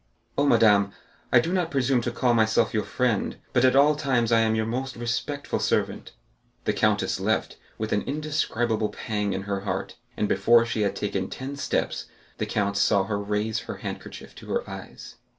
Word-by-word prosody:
"Oh, 145 - +2
madame, 105 -5 +4 0.4
I - - +7
do 165 +9 -1
not 180 -3 +1
presume 135 -3 +2
to 120 - -2
call 125 0 +2
myself 110 -1 +2
your 110 - +2
friend, 115 0 0 0.2
but 125 - +3
at 130 0 +5
all 145 +2 +6
times 130 -6 +1
I 115 - +5
am 110 -1 +2
your 110 0 0
most 130 +4 -3
respectful 120 +5 -2
servant." - - -1 0.5
The - - +1
countess - - +1
left - - -1 0.2
with 110 0 -2
an 105 - +2
indescribable 120 -7 -1
pang 105 -3 -2
in 95 - -3
her 100 0 -2
heart, 95 -1 -4 0.2
and 105 - +1
before 115 +2 +4
she 115 -2 -2
had 100 - 0
taken 95 -2 -2
ten 135 +2 -6
steps 140 - -2 0.3
the - - -1
count 100 -1 0
saw 100 0 +3
her 100 +1 -2
raise 105 +2 -1
her - - -7
handkerchief - - -7
to - - -11
her - - -2
eyes. - - -9
115 Hz, 185 wpm, -26 LUFS, 105-130 Hz, 0.5 s, I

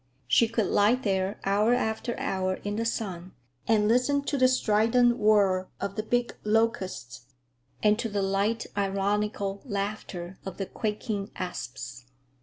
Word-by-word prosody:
She 230 - +5
could 225 -2 0
lie 205 +5 +4
there 195 -5 -1
hour 210 +5 +3
after 230 0 -2
hour 185 -1 -1
in 205 0 -2
the 230 - -1
sun 185 -6 -3 0.3
and 215 -2 +3
listen 250 +5 +2
to 285 - -2
the 255 -2 +5
strident 240 0 +3
whir 200 -3 +3
of 200 0 -3
the - - -1
big 245 +2 -1
locusts, 195 - -1 0.6
and 210 +1 +4
to 230 - -1
the 205 -1 -1
light, 200 +4 0
ironical 200 0 -1
laughter 200 -5 -4
of 190 -2 -7
the 195 - -2
quaking 210 -1 -3
asps. 130 -7 -6
210 Hz, 145 wpm, -27 LUFS, 195-230 Hz, 0.6 s, She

